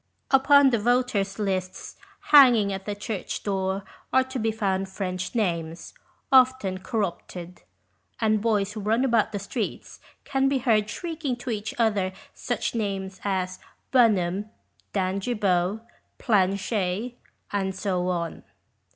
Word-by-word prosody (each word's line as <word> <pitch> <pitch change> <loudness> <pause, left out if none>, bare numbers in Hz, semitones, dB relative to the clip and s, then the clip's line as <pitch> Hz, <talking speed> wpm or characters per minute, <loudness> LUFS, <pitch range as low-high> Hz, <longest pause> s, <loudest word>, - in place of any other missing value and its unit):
Upon 275 0 +6
the 235 - +2
voters' 230 -4 +1
lists 190 -3 -3 0.4
hanging 240 -9 +7
at 190 0 -6
the 205 - -2
church 205 -1 -5
door 195 -1 -1 0.3
are 260 0 +4
to 260 0 -5
be 225 0 +1
found 195 -3 -1
French 185 +1 -4
names, 170 -6 -2 0.4
often 255 -8 +4
corrupted; 185 -3 -4 0.6
and 215 -2 +2
boys 210 -3 +1
who 215 - -6
run 220 +5 +1
about 230 -4 +2
the 205 - -3
streets 205 +2 -5 0.2
can 270 -1 +1
be 275 - +1
heard 220 -5 +2
shrieking 315 -1 -3
to 245 0 -5
each 215 -1 -4
other 205 -5 +1 0.2
such - - -3
names 195 -4 -3
as 185 -2 -2 0.3
Bunnum, 205 -5 +3 0.4
Dangibow, 195 0 0 0.4
Planchey, 200 +2 0 0.3
and 190 -2 -1
so 185 -2 -1
on. 170 -2 -3
205 Hz, 125 wpm, -25 LUFS, 190-235 Hz, 0.6 s, hanging